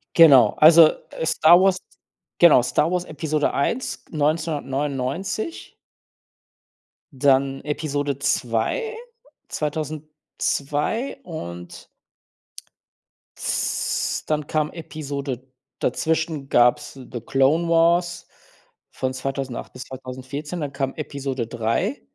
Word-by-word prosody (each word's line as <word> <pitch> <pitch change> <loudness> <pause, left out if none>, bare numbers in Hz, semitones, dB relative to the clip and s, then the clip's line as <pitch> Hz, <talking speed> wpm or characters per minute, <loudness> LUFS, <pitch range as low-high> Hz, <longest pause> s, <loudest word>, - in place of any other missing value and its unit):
Genau. 150 -7 +7
Also, 160 +1 +8 0.2
äh, - - -4
Star 170 +2 +6
Wars 190 -1 +3 0.6
genau, 170 -7 +7
Star 125 +7 +1
Wars 180 -1 -1
Episode 155 -1 -1
1, 235 - -2
1999 150 - -2 1.4
dann 135 0 +2
Episode 145 -2 -2
2, 125 - -1 0.5
2002 150 - -3
und 90 - -8 1.5
z - - -1
dann 150 -1 -1
kam 155 -1 -1
Episode 140 -5 -6 0.3
dazwischen 160 +1 -1
gab's 125 +5 +3
The 125 -3 -9
Clone 135 +8 +2
Wars 170 +1 +2 0.6
von 130 0 -3
2008 135 -1 -5
bis 125 - -8
2014. 130 +5 -7
Dann 140 -1 -4
kam 135 -1 -2
Episode 135 -5 -4
3, 115 - -1
145 Hz, 90 wpm, -23 LUFS, 135-160 Hz, 1.5 s, Also